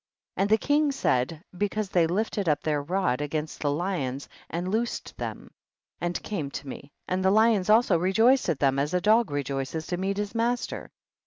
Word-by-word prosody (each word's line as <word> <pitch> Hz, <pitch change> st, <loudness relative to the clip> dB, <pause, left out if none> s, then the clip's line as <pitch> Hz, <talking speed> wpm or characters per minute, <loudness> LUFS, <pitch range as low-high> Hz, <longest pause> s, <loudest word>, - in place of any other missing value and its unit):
And 200 Hz, -, +1 dB
the 220 Hz, -, +5 dB
king 290 Hz, +4 st, +2 dB
said, 150 Hz, -, 0 dB
because 205 Hz, +2 st, -1 dB
they 170 Hz, -3 st, +3 dB
lifted 200 Hz, 0 st, -1 dB
up 150 Hz, -, +1 dB
their 150 Hz, -2 st, 0 dB
rod 160 Hz, -4 st, 0 dB
against 150 Hz, +1 st, -3 dB
the 145 Hz, -, 0 dB
lions 145 Hz, -4 st, -2 dB, 0.2 s
and 175 Hz, +2 st, -3 dB
loosed 225 Hz, +5 st, -2 dB
them, -, -, -6 dB, 0.5 s
and 175 Hz, 0 st, -2 dB
came 165 Hz, -10 st, -3 dB
to 140 Hz, -, -7 dB
me, 140 Hz, +2 st, -8 dB, 0.2 s
and 185 Hz, +1 st, -1 dB
the 190 Hz, -, +4 dB
lions 215 Hz, -1 st, +3 dB
also 215 Hz, -5 st, +5 dB
rejoiced 225 Hz, +7 st, +3 dB
at 160 Hz, -, +1 dB
them 135 Hz, -1 st, +2 dB
as 150 Hz, +5 st, 0 dB
a -, -, +3 dB
dog 215 Hz, +2 st, +3 dB
rejoices 140 Hz, +2 st, -3 dB
to 175 Hz, -, -3 dB
meet 195 Hz, +2 st, -2 dB
his 205 Hz, 0 st, -3 dB
master. 235 Hz, +1 st, -1 dB
180 Hz, 185 wpm, -27 LUFS, 150-215 Hz, 0.5 s, the